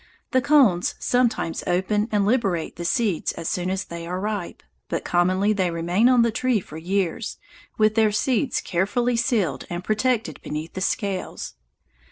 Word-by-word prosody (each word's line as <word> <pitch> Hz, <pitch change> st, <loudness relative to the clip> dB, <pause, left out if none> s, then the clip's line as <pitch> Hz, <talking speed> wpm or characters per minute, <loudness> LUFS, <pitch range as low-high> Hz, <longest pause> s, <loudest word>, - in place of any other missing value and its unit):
The 260 Hz, -, +3 dB
cones 255 Hz, -11 st, +4 dB
sometimes 240 Hz, -9 st, 0 dB
open 205 Hz, +5 st, +1 dB
and 205 Hz, -2 st, +2 dB
liberate 200 Hz, -8 st, 0 dB
the 170 Hz, -, -6 dB
seeds 205 Hz, -2 st, 0 dB
as 165 Hz, -, -6 dB
soon 180 Hz, 0 st, -1 dB
as 190 Hz, 0 st, -1 dB
they 170 Hz, 0 st, -7 dB
are 180 Hz, +1 st, -3 dB
ripe, 205 Hz, -3 st, -4 dB, 0.3 s
but -, -, -3 dB
commonly 185 Hz, +4 st, +2 dB
they 190 Hz, -3 st, +1 dB
remain 175 Hz, +8 st, +2 dB
on 250 Hz, -2 st, +5 dB
the 235 Hz, -, +2 dB
tree 250 Hz, 0 st, +1 dB
for 155 Hz, -4 st, -10 dB
years, 190 Hz, +4 st, -2 dB, 0.4 s
with 215 Hz, 0 st, +4 dB
their 220 Hz, -1 st, +3 dB
seeds 250 Hz, +4 st, 0 dB
carefully 205 Hz, +7 st, 0 dB
sealed 230 Hz, -, 0 dB
and 175 Hz, +1 st, -4 dB
protected 215 Hz, -, 0 dB
beneath 155 Hz, +2 st, -5 dB
the 185 Hz, -, -5 dB
scales. 195 Hz, -1 st, -2 dB
200 Hz, 165 wpm, -23 LUFS, 175-230 Hz, 0.4 s, on